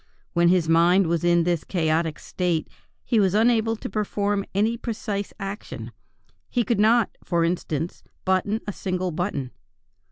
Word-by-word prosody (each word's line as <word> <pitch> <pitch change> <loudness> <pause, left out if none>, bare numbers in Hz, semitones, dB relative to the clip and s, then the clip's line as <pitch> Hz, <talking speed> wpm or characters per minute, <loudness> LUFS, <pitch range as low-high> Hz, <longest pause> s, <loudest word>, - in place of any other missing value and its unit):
While 170 0 +4
his 175 -2 +3
mind 170 +4 +5
was 170 0 0
in 170 -1 +4
this 170 -2 0
chaotic 160 -2 0
state 175 -3 -1 0.4
he 230 - +2
was 195 -1 +3
unable 225 0 +3
to - - -6
perform 205 -1 -1
any 220 +4 +2
precise 215 -4 -4
action; 195 +2 -6 0.6
he 245 - +1
could 235 -2 0
not, 225 +1 +3
for 170 -2 +1
instance, 165 -1 -2 0.2
button 195 +4 +1
a 205 - -4
single 185 -1 -2
button.... 155 -6 -3
190 Hz, 150 wpm, -24 LUFS, 170-210 Hz, 0.6 s, mind